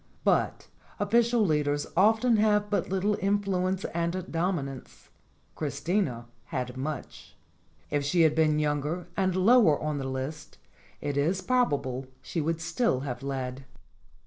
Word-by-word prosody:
But - - +1 0.3
official 230 +2 +3
leaders 145 -3 +1
often 220 +5 +4
have 210 -1 +2
but 205 - 0
little 195 +2 +1
influence 195 -2 0
and 170 +2 -2
dominance: 165 -7 -3 0.4
Chris 140 -2 -4
tina 150 - -1 0.2
had 125 -4 -4
much. 145 +4 -6 0.6
If 145 -1 +1
she 170 +5 +2
had 160 -2 +5
been 155 -1 +3
younger 150 +4 -1
and 185 -2 +1
lower 195 - +5
on 150 -1 -2
the 135 - -3
list, 130 +4 -5 0.4
it 145 -1 -2
is 170 +7 +1
probable 145 - 0 0.2
she 165 - -2
would 165 +2 -1
still 165 - 0
have 125 -3 -5
led. 135 -1 -4
165 Hz, 135 wpm, -28 LUFS, 140-195 Hz, 0.6 s, had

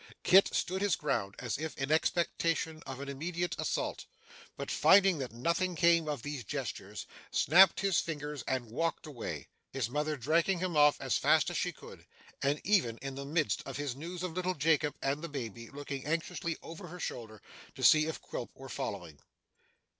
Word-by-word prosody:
Kit 190 +2 +7
stood 190 +2 -1
his 200 -4 +3
ground 100 -9 -2
as 120 +1 -3
if 160 0 -5
in 135 +2 -2
expectation 160 -1 +1
of 135 -1 -6
an 140 - -6
immediate 170 +5 -3
assault, - - -2 0.5
but - - -4
finding 195 -4 +5
that 130 -2 -4
nothing 170 +9 0
came 170 0 +4
of 145 -6 -3
these 145 -4 -4
gestures, 95 - -5 0.2
snapped 185 +3 +6
his 195 -4 +3
fingers 150 -4 -4
and 130 -2 -1
walked 165 +8 -1
away; 115 - -6 0.2
his 125 -4 -2
mother 150 +2 -1
dragging 165 +8 +2
him 180 -1 -2
off 150 0 +5
as - - 0
fast - - +3
as - - -2
she - - 0
could, - - -13 0.4
and, 140 +2 +1
even 175 - +2
in 135 0 -4
the 140 +1 -6
midst 155 +1 0
of 135 - -5
his 145 -3 -3
news 170 +5 -6
of 180 -3 -3
little 185 +1 -1
Jacob 150 -1 +2
and 140 +2 0
the 170 - -5
baby, 115 -5 -6
looking 140 -1 -6
anxiously 165 +2 -2
over 170 +3 -8
her 180 +2 -9
shoulder 110 -7 -5 0.4
to - - -7
see 155 0 +7
if 160 - -4
Quilp 120 - -6
were 135 0 -10
following. 85 -10 -5
150 Hz, 185 wpm, -32 LUFS, 135-170 Hz, 0.5 s, Kit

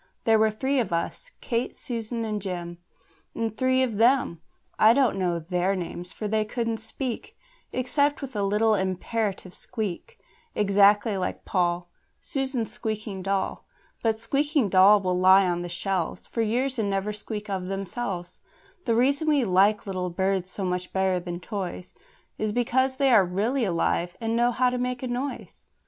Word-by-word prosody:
There 225 -1 +4
were 220 0 +4
three 265 +6 0
of 235 - -1
us 170 - -3
Kate, 235 0 -1
and - - -25
Susan, 230 -1 -4
and 210 -1 -2
Jem 175 -3 -5 0.6
And 225 -2 -2
three 260 +2 +2
of 230 -5 -2
them 235 -8 +3 0.4
I 220 +1 +7
don't 270 -6 +3
know 180 -3 0
their 180 +3 0
names, 175 0 -5
for 215 - -5
they 215 +1 +1
couldn't 230 +1 -2
speak, 235 +2 -5 0.3
Except 285 +3 +1
with 270 -4 -7
a 205 - 0
little 210 +3 +2
imperative 190 0 -2
squeak, 220 - -5 0.4
Exactly 205 +1 +4
like 180 - -3
Poll, 175 -1 0 0.3
Susan's 265 -5 -3
squeaking 215 -4 -4
doll; 195 +1 -2 0.3
But 220 -1 +1
squeaking 280 0 +1
dolls 195 +2 +6
will 180 -1 0
lie 190 +1 +7
on 175 -1 0
the 175 - -5
shelves 180 0 -2
For 230 - -3
years 250 +4 0
and 205 -2 0
never 195 +2 -1
squeak 210 0 -6
of 190 -2 -3
themselves: 195 -2 -4 0.4
The 230 -3 +2
reason 280 +6 +2
we 290 -5 +3
like 200 +2 +3
little 185 -2 -2
birds 190 +1 -1
so 195 0 -4
much 180 0 -2
better 190 -1 +1
than 175 0 -5
toys 185 -2 -5 0.5
Is 215 -1 0
because 260 +3 +1
they 270 0 +3
are 215 -5 +7
really 215 +8 0
alive, 175 -1 0
and 225 -1 -1
know 240 +1 +3
how 250 +1 +2
to 250 - -2
make 250 0 -2
a - - -1
noise. 255 +3 -5
210 Hz, 170 wpm, -26 LUFS, 185-245 Hz, 0.6 s, I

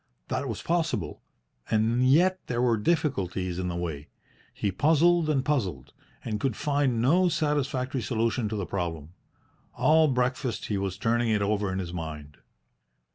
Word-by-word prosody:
That 130 +1 -2
was 110 - -5
possible, 160 - -1 0.5
and 115 +3 +2
yet 175 +8 +4
there 120 -1 -2
were 120 -2 +3
difficulties 100 - -1
in 90 - -2
the 85 - -3
way. 80 -4 -4 0.4
He 100 - -2
puzzled 160 - +3
and 135 -4 +1
puzzled, 90 - -2 0.3
but 110 -2 -2
could 130 -1 -1
find 140 -5 0
no 175 +8 +4
satisfactory 140 -5 -1
solution 115 +1 -1
to 110 - -3
the 100 -3 -2
problem. 85 -4 -4 0.6
All 160 +1 +4
breakfast 125 -2 -1
he 105 - -1
was 95 -2 -3
turning 115 +2 +1
it 105 -2 +2
over 105 -1 0
in 95 - -3
his 90 -3 -4
mind. 75 -3 -7
115 Hz, 155 wpm, -27 LUFS, 95-145 Hz, 0.6 s, yet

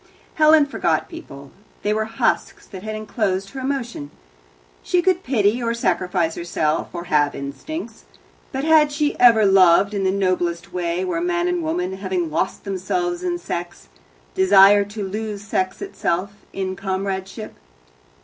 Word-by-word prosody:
Helen 310 -1 +5
forgot 280 - -1
people. 140 - -11 0.3
They 210 - +1
were 220 0 0
husks 225 +1 -1
that 190 -3 -10
had 215 +1 -5
enclosed 200 -3 -2
her 270 - -7
emotion. 255 - -4 0.7
She 360 - +1
could 370 -1 +2
pity, 230 -2 +1
or 230 0 -1
sacrifice 180 -7 0
herself, 160 -3 -1
or 170 -1 -6
have 145 -4 +1
instincts, 140 - -7 0.5
but 265 +1 -3
had 310 -1 +5
she 295 0 0
ever 230 -3 +6
loved 190 +1 +5
in 200 -1 -1
the 190 - +2
noblest 185 -2 -1
way, 175 0 -1
where 170 -2 -2
man 175 0 0
and 180 -1 0
woman, 180 +4 -2
having 185 -4 -2
lost 170 +4 -2
themselves 350 - -2
in 355 -1 -1
sex, 175 - -6 0.4
desire 195 +1 +6
to 205 -1 -6
lose 210 0 -5
sex 190 - -2
itself 195 - -2 0.2
in 190 -1 -3
comradeship? 195 +2 -4
195 Hz, 150 wpm, -21 LUFS, 180-235 Hz, 0.7 s, ever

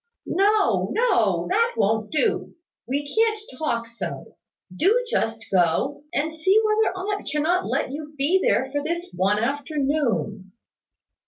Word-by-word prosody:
"No, 410 +2 +2
no; 485 +2 +2
that 465 +4 +2
won't 215 +1 +1
do. 305 - 0 0.3
We 285 +3 -2
can't 440 +6 +1 0.2
talk 235 -7 -1
so. 230 0 -7 0.4
Do 445 - +3
just 225 - -1
go, 190 - +1
and 315 -1 -1
see 375 +7 +3
whether 430 -2 +2
aunt 405 +2 -3
cannot 325 +5 +1
let - - -1
you 300 +1 -7
be 305 +8 +3
there 265 0 +1
for 290 +1 -1
this 340 +4 -4
one 195 +3 +2
afternoon." 270 - -1
300 Hz, 135 wpm, -24 LUFS, 235-385 Hz, 0.4 s, Do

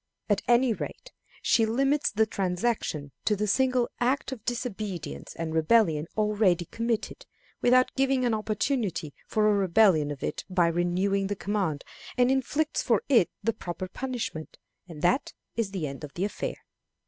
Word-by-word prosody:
At 205 -1 +2
any 240 0 +4
rate, - - -7 0.3
she 230 - +4
limits 275 +6 +2
the 220 +1 +2
transaction 180 -7 -2
to 210 - +3
the 210 +1 -1
single 255 +3 +2
act 260 +3 0
of 240 -5 -7
disobedience 210 - -4
and 165 -1 -4
rebellion 160 -2 +3
already 210 -5 +2
committed, 230 +4 -3 0.3
without 255 +1 +4
giving 270 -1 +2
an 235 - +2
opportunity 215 - -1
for 215 -1 +2
a 210 - +4
repetition 190 -5 +4
of 145 -2 -6
it - - -3
by 180 -2 +3
renewing 185 +3 +1
the 205 - -2
command, 195 -8 -2 0.3
and 250 +1 +4
inflicts 290 +4 0
for 230 -5 +2
it 235 -10 +5
the 230 +2 +1
proper 180 0 -5
punishment, 235 -7 -5 0.3
and 155 -3 -9
that 245 +11 +2 0.2
is 230 -4 0
the 190 -5 -3
end 140 +1 -6
of 145 - -8
the 185 - 0
affair. - - -3
210 Hz, 160 wpm, -27 LUFS, 175-245 Hz, 0.3 s, it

